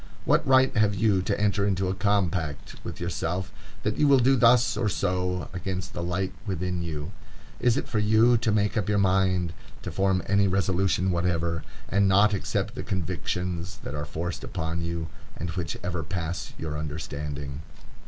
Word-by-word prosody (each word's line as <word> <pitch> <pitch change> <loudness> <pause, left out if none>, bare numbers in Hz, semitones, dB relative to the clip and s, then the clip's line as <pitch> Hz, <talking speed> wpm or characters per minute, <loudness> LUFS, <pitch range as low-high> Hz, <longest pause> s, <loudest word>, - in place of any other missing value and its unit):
What - - +3
right 130 0 +5
have 105 -2 +3
you 100 -1 +3
to 95 - -1
enter 100 -1 +2
into 95 -2 +1
a 95 - 0
compact 95 -6 0
with - - -6
yourself 90 +3 -2 0.3
that 105 +1 -1
you 150 - +4
will 140 -1 +7
do 130 +2 +4
thus 120 -1 +5
or 110 -1 0
so, 90 -1 -1
against 90 +1 -4
the - - -4
light 90 +2 -1
within 90 -1 -2
you? 80 0 -4 0.5
Is 120 -2 +3
it - - -2
for 110 - 0
you 110 +3 +5
to 115 -1 +1
make 105 0 +1
up 105 -3 0
your 105 - +2
mind,—to 95 -3 0
form 95 -2 +1
any 100 0 +3
resolution 95 0 +1
whatever,—and 85 +2 0
not 100 +2 +5
accept 100 - -1
the - - -5
convictions 90 0 -3
that - - -5
are 75 0 -3
forced 85 +4 -4
upon 85 -2 -3
you, 85 -1 -3 0.3
and 85 +1 -3
which 85 -1 -3
ever 90 -1 -2
pass 85 +1 -4
your 75 -2 -4
understanding? 75 -2 -5
95 Hz, 170 wpm, -27 LUFS, 85-100 Hz, 0.5 s, will